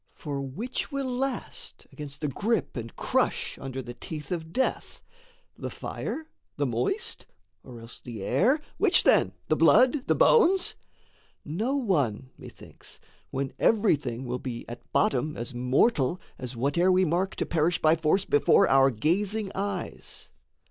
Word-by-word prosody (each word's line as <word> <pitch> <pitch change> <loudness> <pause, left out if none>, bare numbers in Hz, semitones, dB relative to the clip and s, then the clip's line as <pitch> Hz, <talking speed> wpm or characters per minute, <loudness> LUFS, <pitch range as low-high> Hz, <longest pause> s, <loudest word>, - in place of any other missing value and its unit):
For 140 -3 -4
which 215 - -4
will 270 -3 -2
last 265 0 -4
against 145 -2 -8
the 150 - 0
grip 205 - -1
and 115 -2 -6
crush - - -1
Under 135 -1 -5
the 120 - -7
teeth 150 +4 -8
of 160 -2 -4
death? 260 +8 -1 0.6
the - - -5
fire? 320 - -5 0.3
the 145 - +1
moist? 120 -1 -2 0.4
Or 120 -2 -11
else 115 +1 -12
the 115 -5 -7
air? 220 - +3 0.2
which - - +4
then? - - +4
the - - +2
blood? 260 +2 +4
the - - +3
bones? 385 -5 +4 0.7
No 215 - -1
one, 145 - 0
methinks, - - -13 0.3
when 135 0 -3
every 215 -5 +4
thing 130 -3 -5
will 125 +1 -3
be 120 -3 -6
At 120 - -10
bottom 150 +4 +1
as 120 +3 -5
mortal 130 - +2 0.2
as 125 -1 -6
whate'er 145 +9 +2
we 185 0 +4
mark 180 +4 0
To - - -2
perish 170 +1 +1
by 155 +1 +4
force 165 +4 +1
before 145 - +4
our 135 0 +5
gazing 195 - 0
eyes. 200 +1 -5
155 Hz, 150 wpm, -27 LUFS, 130-205 Hz, 0.7 s, our